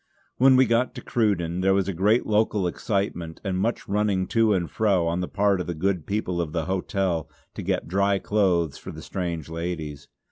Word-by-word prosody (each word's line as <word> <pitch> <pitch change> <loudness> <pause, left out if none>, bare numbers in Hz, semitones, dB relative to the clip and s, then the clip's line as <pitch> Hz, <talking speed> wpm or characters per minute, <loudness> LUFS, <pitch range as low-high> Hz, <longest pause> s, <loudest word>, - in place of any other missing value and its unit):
When 130 +1 +6
we 130 0 +6
got 120 +2 +1
to - - -6
Cruden 90 -7 0
there 95 +1 +3
was 95 -1 +1
great 105 +7 +2
local 105 -2 +1
excitement, 90 -3 -2
and 95 -3 -1
much 115 +5 -1
running 100 -2 +1
to 115 -2 +3
and 90 -4 +1
fro 100 -5 +1
on 85 +2 0
the 90 - -2
part 100 -1 +1
of - - -6
the 85 - -3
good 90 -1 -1
people 90 -4 -1
of 80 -2 -4
the 80 -2 -1
hotel 95 -3 -1 0.2
to - - -6
get - - -1
dry 100 +3 +2
clothes 90 -7 +1
for - - -8
the - - -10
strange 85 -5 -4
ladies. 80 -3 -5
95 Hz, 200 wpm, -25 LUFS, 85-105 Hz, 0.2 s, When